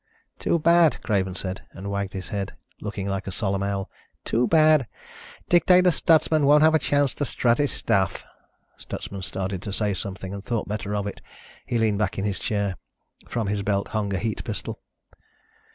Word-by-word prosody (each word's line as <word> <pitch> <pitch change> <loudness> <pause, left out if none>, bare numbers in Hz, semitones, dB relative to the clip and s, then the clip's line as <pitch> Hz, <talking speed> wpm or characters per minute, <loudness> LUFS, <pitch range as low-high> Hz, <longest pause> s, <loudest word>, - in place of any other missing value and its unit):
"Too - - +1
bad," 170 0 +4
Craven 95 -4 0
said, 95 0 -4
and 100 +1 -6
wagged 100 -1 -2
his 95 -2 -6
head, 100 -2 -4 0.3
looking 105 -2 -4
like 95 0 -3
a - - -3
solemn 100 0 -1
owl. 100 -1 -2 0.4
"Too 120 +2 +1
bad. 155 -5 +5 0.6
Dictator 180 +1 +5
Stutsman 155 -2 +3
won't 150 +1 +6
have 160 0 +6
a 160 - +4
chance 145 -3 +2
to - - -3
strut 120 -2 +1
his 145 -1 +2
stuff." 95 -3 0 0.6
Stutsman 100 -1 -6
started 95 0 -2
to 100 - -5
say 105 +1 +1
something 95 0 -5
and 100 0 -6
thought 115 0 -2
better 105 0 -3
of 100 -1 -1
it. 100 - -6 0.5
He 120 - 0
leaned 110 -3 +1
back 105 -3 -1
in 100 - -1
his 100 -3 -2
chair. 100 -3 -1 0.5
From 115 -2 -2
his 100 0 -1
belt 100 0 -1
hung 105 -2 -2
a 95 - 0
heat 110 +1 -3
pistol. - - -5
105 Hz, 185 wpm, -25 LUFS, 100-135 Hz, 0.6 s, won't